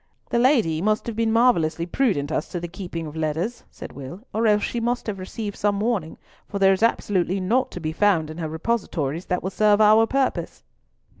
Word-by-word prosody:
"The 235 - +2
Lady 230 - +3
must 215 +2 +1
have 235 - -4
been 225 0 +1
marvellously 170 -9 +2
prudent 175 - 0
as - - -2
to 175 - -4
the 175 - -5
keeping 170 -2 -6
of 150 0 -8
letters," 160 +9 -2
said - - -10
Will, 140 - -9
"or 225 +1 +1
else 210 -1 +3
she 240 - -2
must 240 +1 -1
have 205 -3 -4
received 205 +2 -5
some 205 -1 0
warning; 205 -8 -1 0.3
for 200 - -4
there 195 -1 +5
is 190 - -3
absolutely 195 -4 +1
naught 225 +8 +1
to - - -7
be 155 -1 -3
found 170 -5 +2
in 155 - -9
her 160 -2 -3
repositories 165 -3 -2
that 180 - -1
will 190 - -2
serve 210 +1 +3
our 215 +1 +6
purpose." 270 +1 -1
200 Hz, 210 wpm, -23 LUFS, 165-225 Hz, 0.3 s, our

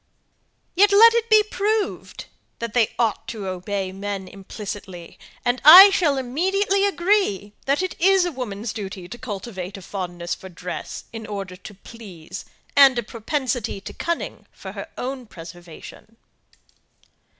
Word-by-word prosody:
Yet 405 +3 +5
let 455 +3 +8
it 465 0 0
be 430 -1 +6
proved, 425 0 -2 0.3
that 235 -2 -5
they 235 -3 +1
ought 225 -3 -1
to 220 -4 -6
obey 190 +1 -4
man 195 0 -5
implicitly, 195 -2 -9 0.3
and 245 +1 0
I 370 +6 +11
shall 305 -7 +1
immediately 385 +10 +1
agree 345 - 0
that 280 +6 +1
it 370 - -4
is 380 0 +4
woman's 235 - -5
duty 195 -3 -7
to 215 - -9
cultivate 200 -5 -6
a - - -11
fondness 175 -3 -5
for 190 - -9
dress, 180 0 -7
in 225 -1 -7
order 195 -3 -6
to 190 +3 -12
please, 190 -5 -11 0.3
and 275 -3 +7
a 240 - -1
propensity 235 -1 -3
to - - -9
cunning 340 0 -4
for - - -10
her - - -8
own 255 -1 -5
preservation. 175 +5 -12
225 Hz, 140 wpm, -22 LUFS, -, 0.3 s, I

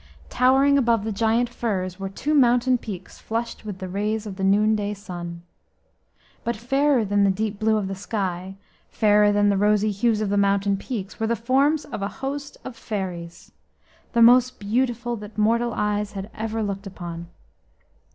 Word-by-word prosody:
Towering 270 +2 +4
above 230 -4 +2
the 220 - -2
giant 225 +3 +1
firs 195 -6 -3
were 195 0 -4
two 285 +10 -2
mountain 250 -2 +4
peaks 195 -5 -8
flushed 230 0 -4
with 205 -3 -5
the 185 - -6
rays 210 +3 -2
of 200 -3 -6
the 190 - -5
noonday 210 +1 +2
sun. 175 -4 -8 1.0
But 235 - -1
fairer 270 +2 +2
than 205 0 +2
the 200 - +4
deep 205 +1 -2
blue 220 0 +2
of 205 -2 -2
the 195 - -3
sky, 190 -2 -4 0.3
fairer 210 -1 +4
than 205 0 +3
the 200 - +2
rosy 210 +1 +2
hues 215 +2 +1
of 215 -2 -1
the 205 - +1
mountain 200 0 +2
peaks, 200 -1 -6
were 225 - 0
the 235 - +1
forms 275 +6 +2
of - - -6
a 200 - -1 0.2
host 285 +1 -5
of 260 - -7
fairies, 185 -7 -6 0.6
the 235 -1 +5
most 250 +2 +5
beautiful 240 +3 -1
that 210 +1 -10
mortal 230 +3 +2
eyes 210 0 -1
had 200 +2 -6
ever 220 0 -3
looked 200 0 -4
upon. 170 -3 -7
210 Hz, 175 wpm, -24 LUFS, 195-235 Hz, 1.0 s, the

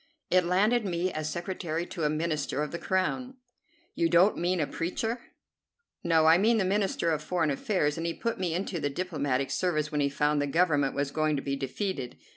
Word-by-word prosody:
"It 185 -1 +4
landed 210 +6 +3
me 180 -1 -1
as 155 0 -3
secretary 170 0 -3
to 165 - -5
a - - +3
Minister 155 -2 -1
of 150 - -4
the 170 - -4
Crown." 250 +8 -1 0.6
"You 165 - +1
don't 180 +5 +5
mean 175 +1 0
a 150 - +2
preacher?" 225 - -3 0.8
"No, 165 -2 +3
I 165 +2 +6
mean 225 +3 +4
the 195 - +1
Minister 195 -3 +1
of 155 -1 -1
Foreign 160 -1 0
Affairs, 150 0 0
and 165 - -2
he 170 - -2
put 230 -3 -3
me 175 -3 -1
into 180 -1 -2
the 145 -1 -1
diplomatic 140 -5 -2
service 155 -5 0
when 150 -1 0
he 140 - +2
found 150 +1 +1
the 145 - 0
Government 145 -3 +2
was 140 0 -1
going 155 0 +1
to 135 - -3
be 140 -1 -1
defeated. 135 - -4
165 Hz, 205 wpm, -28 LUFS, 150-185 Hz, 0.8 s, I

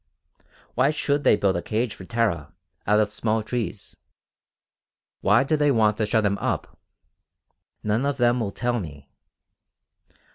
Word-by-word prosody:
Why 130 +3 +3
should 145 -1 0
they - - +5
build 100 -3 +1
a - - -2
cage 110 +2 -1
for 95 - -11
Tara, 90 -9 -1 0.3
out 105 +1 +4
of 105 -1 +1
small 110 +1 -1
trees? 115 -3 -4 1.2
Why 120 - +4
do 155 +3 +1
they 145 -1 +2
want 110 -5 +3
to 110 - 0
shut 110 -1 +2
him 100 0 0
up? - - -3 1.0
None 110 +6 0
of 140 -1 -1
them 120 -1 +3
will 110 -4 -1
tell 120 +4 -1
me. 75 -6 -9
110 Hz, 150 wpm, -24 LUFS, 105-125 Hz, 1.2 s, they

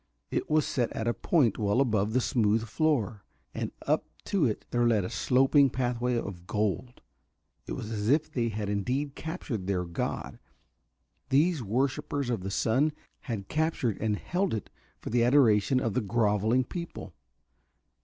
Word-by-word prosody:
It - - -2
was 155 -1 +3
set 120 -3 -1
at 110 - -3
a 120 - +2
point 130 - +2
well 105 +3 +2
above 110 -5 +1
the 130 - +3
smooth 110 -3 +2
floor, 115 -7 0 0.3
and - - -3
up - - +1 0.2
to 185 -9 +2
it 110 - -3
there 120 0 +2
led 110 -4 +3
a - - -5
sloping 135 +2 +4
pathway 125 -1 -1
of 90 -5 -6
gold. 110 +4 -2 0.7
It - - -4
was 110 - -5
as 105 0 -2
if 155 +3 +2
they 120 -5 0
had 105 -1 -3
indeed 125 +8 -1
captured 145 - -5
their 90 -2 0
god, 85 0 -4 0.9
these 150 +3 +3
worshipers 130 +3 -1
of 115 -5 -1
the 95 - -4
sun, 130 +10 +1 0.3
had 110 -7 -5
captured 155 -9 -1
and 110 -1 +1
held 180 - -1
it 105 - -6 0.3
for - - -7
the 120 0 +3
adoration 125 -2 +4
of 115 -4 -1
the 125 - +1
grovelling 110 +3 +2
people. 170 - -7
120 Hz, 165 wpm, -29 LUFS, 105-135 Hz, 0.9 s, sloping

